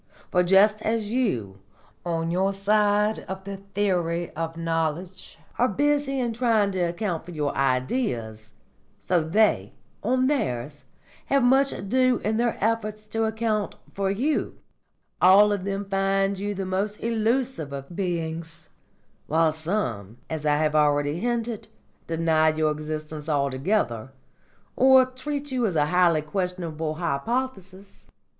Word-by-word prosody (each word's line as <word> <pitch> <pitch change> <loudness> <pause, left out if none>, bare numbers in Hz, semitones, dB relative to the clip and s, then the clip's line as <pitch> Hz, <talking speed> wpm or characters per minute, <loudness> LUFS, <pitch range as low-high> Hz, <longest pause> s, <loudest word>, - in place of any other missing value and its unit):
For 180 - +4
just 200 +4 +4
as 220 -1 -1
you, 120 - -1 0.4
on 165 -1 -2
your 190 +3 +1
side 210 +1 +2
of 190 0 -6
the 200 0 -6 0.2
theory 175 -4 0
of 165 +1 -4
knowledge, 165 +2 -3 0.2
are 245 - +4
busy 285 +3 +1
in 240 -2 -1
trying 225 -4 +2
to 190 - -3
account 175 0 -1
for 170 - -13
your 150 -4 -2
Ideas, 125 - -1 0.5
so 180 -2 +1
they, 160 - +2 0.3
on 255 +4 +1
theirs, 145 - -2 0.4
have 275 -2 +3
much 270 +2 +4
ado 255 +5 +1
in 220 +1 0
their 235 0 0
efforts 215 -1 -1
to 225 0 0
account 220 -1 -1 0.2
for 195 -1 -1
you; 255 +11 -1 0.6
all 200 +3 +7
of 200 -2 -2
them 200 0 -2
find 195 0 0
you 205 +1 -3
the 195 0 -3
most 195 +3 -2
illusive 230 - 0
of 140 +4 -7
beings, 165 -3 -4 0.6
while 160 0 +2
some, 155 - -3
as 155 -1 -2
I 145 0 +3
have 155 0 +1
already 145 +1 +2
hinted, 235 -1 -2 0.4
deny 160 -1 +2
your 155 0 +1
existence 155 0 -5
altogether, 140 - 0 0.7
or 260 0 +6
treat 275 +3 -5
you 250 -3 +1
as 185 - -3
a 150 -1 +3
highly 170 -1 +3
questionable 165 -3 -3
hypothesis. 190 - -4
190 Hz, 135 wpm, -25 LUFS, 155-220 Hz, 0.7 s, all